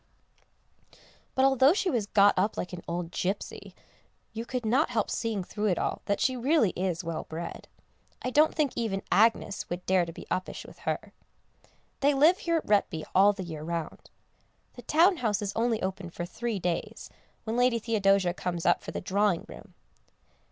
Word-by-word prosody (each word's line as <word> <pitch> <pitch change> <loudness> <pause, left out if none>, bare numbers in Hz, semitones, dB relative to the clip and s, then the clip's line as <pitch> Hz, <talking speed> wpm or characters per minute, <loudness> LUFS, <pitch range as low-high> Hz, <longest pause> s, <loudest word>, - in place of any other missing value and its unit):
But 265 - +4
although 270 +2 +5
she 380 -2 0
was 225 -6 -1
got 205 -1 +5
up 200 +4 0
like 180 - -4
an 175 - -6
old 170 0 -3
gipsy 195 +3 -4 0.6
you 225 +1 -5
could 250 -2 -3
not 260 +8 +2
help 225 -4 -1
seeing 225 -5 -2
through 210 +4 -3
it 180 - +1
all - - -2
that 200 - 0
she 260 - +1
really 255 - +2
is 180 -1 -2
well 165 -1 -4
bred; 165 +2 -6 0.6
I 255 - -2
don't 305 +4 +4
think 300 -4 +1
even 215 -5 -2
Agnès 215 -2 +2
would 175 +1 -5
dare 185 -2 +2
to - - -6
be - - -10
uppish 185 - -3
with - - -14
her. - - -4 0.9
They 285 +1 +3
live 315 +7 +5
here 335 -1 0
at - - -4
Retby 195 -6 +1
all 195 +2 +6
the 195 -2 -6
year 160 -3 -7
round. 165 0 -5 0.6
The 245 - -10
town 335 - +4
house 215 -7 0
is 205 -1 -3
only 230 -2 0
opened 190 -2 -4
for 175 - -3
three 225 +4 -3
days, 175 -2 -3 0.3
when 220 0 -3
Lady 245 -1 +3
Theodosia 195 -5 +2
comes 175 -2 -4
up 175 - +3
for - - -8
the - - -4
Drawing 200 -1 +1
room. - - -13
205 Hz, 185 wpm, -28 LUFS, 180-245 Hz, 0.9 s, all